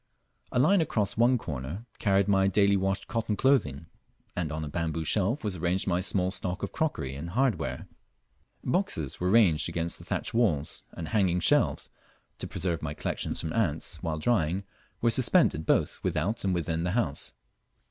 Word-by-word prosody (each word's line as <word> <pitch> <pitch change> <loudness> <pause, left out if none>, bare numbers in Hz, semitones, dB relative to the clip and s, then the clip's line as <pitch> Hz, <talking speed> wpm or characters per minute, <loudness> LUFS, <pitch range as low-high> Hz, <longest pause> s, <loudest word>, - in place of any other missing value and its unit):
A - - -1
line 170 +9 +5
across 110 -10 0
one 120 +3 +4
corner 75 - -6
carried 100 -1 +2
my 95 -1 +3
daily 100 +1 +4
washed 95 0 -1
cotton 110 -2 -1
clothing, 90 - +2 0.5
and 85 -4 -2
on 80 0 -3
a - - -5
bamboo 80 +1 -2
shelf 105 - +1
was 100 -4 -2
arranged 90 +3 0
my 90 -2 +1
small 95 -1 +1
stock 90 0 -3
of - - -3
crockery 145 - -2
and 75 +5 -6
hardware: 125 +5 -1 0.8
Boxes 125 - -1
were 90 - 0
ranged 95 -8 +4
against 85 0 -2
the - - -11
thatch 105 - -3
walls, 85 -12 +1
and 80 - -6
hanging 95 -5 +2
shelves, 85 - +2 0.5
to - - -4
preserve 85 -3 -2
my 75 -1 -4
collections - - -2
from 80 -1 -3
ants 85 -9 -1
while 80 -2 -2
drying, 95 -1 +1 0.4
were 115 - +3
suspended 120 - +3
both - - +2
without 100 +9 0
and 95 -2 +1
within 85 -1 -1
the 90 +1 -1
house. 105 -11 -1
95 Hz, 170 wpm, -28 LUFS, 80-110 Hz, 0.8 s, line